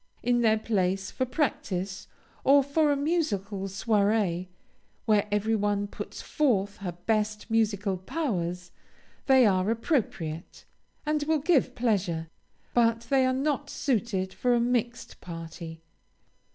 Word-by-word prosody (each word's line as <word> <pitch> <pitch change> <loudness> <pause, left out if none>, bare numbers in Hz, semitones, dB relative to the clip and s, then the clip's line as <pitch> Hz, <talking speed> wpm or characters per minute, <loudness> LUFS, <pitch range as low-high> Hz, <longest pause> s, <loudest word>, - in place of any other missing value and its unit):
In 240 0 +2
their 220 -1 +4
place, 195 -3 -1
for 260 - -2
practice, 200 - -2 0.4
or 280 +1 +6
for 295 +2 +2
a 285 - +1
musical 215 - -1
soirée, 200 -3 +1 0.6
where 210 -2 +3
every 210 +2 +1
one 205 -1 0
puts 205 - -8
forth 205 -9 +1
her 185 -4 -5
best 210 +4 -2
musical 205 -3 +1
powers, 180 - -3 0.6
they 265 -2 +6
are 190 -1 +2
appropriate, 210 - -2 0.4
and 300 0 +1
will 315 +1 +2
give 295 -1 +2
pleasure, 180 -9 0 0.4
but 230 -1 +3
they 265 -1 +4
are - - +2
not 285 +2 -1
suited 215 -10 -1
for 245 -1 +2
a - - +3
mixed 240 0 -1
party. 165 -1 -8
215 Hz, 125 wpm, -28 LUFS, 190-255 Hz, 0.6 s, or